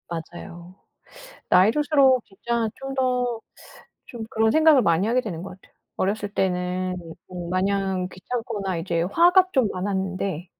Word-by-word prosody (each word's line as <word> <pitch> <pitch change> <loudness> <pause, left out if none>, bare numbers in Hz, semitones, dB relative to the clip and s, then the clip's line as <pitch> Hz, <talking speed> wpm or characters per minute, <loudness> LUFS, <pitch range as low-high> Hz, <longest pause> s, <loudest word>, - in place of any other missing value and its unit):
맞아요. 170 +1 -8 0.7
나이 185 +4 +6
들수록 275 -2 +3
진짜 230 +3 -2
좀 270 0 -6
더 250 -3 0 0.7
좀 235 -2 -8
그런 220 0 +2
생각을 315 -4 +5
많이 170 +2 +2
하게 245 +2 +2
되는 175 -8 -6
것 190 - -8
같아요. - - -25 0.2
어렸을 205 +2 -1
때는 185 -1 -1 0.3
어 175 -2 -7
마냥 190 0 0
귀찮거나 200 -1 -4
이제 165 0 -1
화가 350 - +4
좀 260 -4 +3
많았는데. 190 -2 -3
195 Hz, 275 characters per minute, -24 LUFS, 180-245 Hz, 0.7 s, 나이